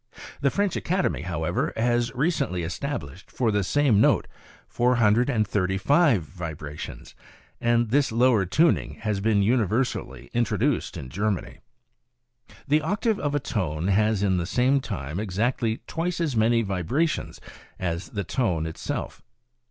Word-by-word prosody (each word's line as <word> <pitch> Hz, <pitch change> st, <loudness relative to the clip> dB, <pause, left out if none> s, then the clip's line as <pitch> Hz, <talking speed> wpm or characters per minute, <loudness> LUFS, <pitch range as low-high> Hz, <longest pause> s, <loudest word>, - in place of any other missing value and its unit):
The 140 Hz, -, +3 dB
French 200 Hz, +4 st, 0 dB
Academy, 185 Hz, +2 st, 0 dB
however, 85 Hz, -1 st, -2 dB
has 120 Hz, +1 st, +1 dB
recently 135 Hz, -, 0 dB
established 90 Hz, -, -5 dB
for 120 Hz, -3 st, 0 dB
the 105 Hz, -1 st, +1 dB
same 125 Hz, -1 st, +3 dB
note -, -, +3 dB, 0.4 s
435 115 Hz, -, +2 dB
vibrations, 80 Hz, -4 st, -8 dB, 0.5 s
and 120 Hz, -1 st, +2 dB
this 140 Hz, -1 st, +3 dB
lower 115 Hz, -2 st, +4 dB
tuning 160 Hz, -, +2 dB
has 105 Hz, -3 st, -1 dB
been 105 Hz, 0 st, +2 dB
universally 120 Hz, +2 st, 0 dB
introduced 120 Hz, -1 st, 0 dB
in 70 Hz, -5 st, -7 dB
Germany. 100 Hz, +5 st, -2 dB, 0.6 s
" -, -, -53 dB, 0.2 s
The 150 Hz, +2 st, +3 dB
octave 205 Hz, -, 0 dB
of 145 Hz, -1 st, -1 dB
a -, -, +2 dB
tone 90 Hz, -, -2 dB
has 105 Hz, +1 st, +2 dB
in 95 Hz, -2 st, +2 dB
the 85 Hz, -1 st, -2 dB
same 130 Hz, +6 st, +2 dB
time 85 Hz, -, -5 dB
exactly 110 Hz, +3 st, -1 dB
twice 170 Hz, +2 st, -2 dB
as 155 Hz, -7 st, -1 dB
many 115 Hz, +1 st, +3 dB
vibra 100 Hz, -, 0 dB
tions -, -, -5 dB, 0.4 s
as 85 Hz, 0 st, -3 dB
the 100 Hz, -2 st, -3 dB
tone 90 Hz, -, -1 dB
itself. 80 Hz, 0 st, -5 dB
110 Hz, 135 wpm, -25 LUFS, 95-135 Hz, 0.6 s, lower